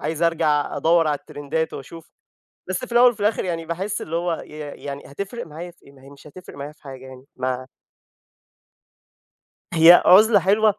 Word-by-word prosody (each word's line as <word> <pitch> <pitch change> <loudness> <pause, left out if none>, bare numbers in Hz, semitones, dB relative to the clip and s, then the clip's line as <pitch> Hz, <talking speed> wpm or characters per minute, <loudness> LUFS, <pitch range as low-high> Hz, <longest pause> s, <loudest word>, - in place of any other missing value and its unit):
عايز 160 +1 -3
أرجع 160 -3 +1
أدوِّر 165 0 +3
على 150 -1 0
الترندات 145 +4 -4
وأشوف. 160 +4 -11 0.6
بس 185 - -1
في 245 - -17
الأول 240 +1 +6
وفي 230 - -16
الآخر، 205 -1 0
يعني 165 -2 -3
باحِس 185 +5 -4
اللي 165 - -5
هو 170 -1 -2
ي - - -19 0.4
يعني، 140 0 -6
هاتفرِّق 200 +11 -7
معايا 165 +3 -9
في - - -29
إيه؟ 140 - -16
ما 135 -1 -20
هي 135 - -15
مش 140 +1 -16
هاتفرِّق 180 +4 -13
معايا 140 +1 -7
في 150 - -26
حاجة 130 -2 -10
يعني. 130 0 -13
ما 130 0 -3 2.1
هي 170 +1 +7
عُزلة 210 +3 +7
حلوة، 210 +2 +3
165 Hz, 185 wpm, -22 LUFS, 145-185 Hz, 2.1 s, هي